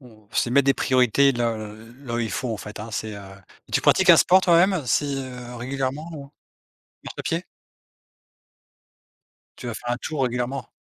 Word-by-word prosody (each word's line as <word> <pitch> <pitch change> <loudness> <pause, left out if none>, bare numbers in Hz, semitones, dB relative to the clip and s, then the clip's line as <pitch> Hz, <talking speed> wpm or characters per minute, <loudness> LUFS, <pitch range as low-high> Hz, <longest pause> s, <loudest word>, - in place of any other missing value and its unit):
on 110 -5 -18
c'est 120 - 0
mettre 140 +2 +3
des 135 - +4
priorités 130 +2 +3
là 120 -3 -1 0.5
là 120 -3 -4
où - - -1
il 115 -3 -2
faut 120 +4 -3
en - - -3
fait, 105 0 -9
hein. 115 - -7
C'est, 110 -1 -4
heu, 100 - -8 0.5
tu - - +2
pratiques 190 -2 +5
un 165 - +9
sport 185 +4 +5
toi-même 175 -2 +3
si, 140 +1 +1
heu, 125 -2 -8
régulièrement? 135 +5 -4
Ou, 140 -2 -8
heu - - -15 0.8
marche - - -7
à - - -3
pied? - - -2 2.1
Tu 125 - -7
vas 115 - -3
faire 120 +2 -4
un - - -4
tour 140 +1 -3
régulièrement? 125 +1 -3
125 Hz, 190 wpm, -23 LUFS, 120-140 Hz, 2.1 s, un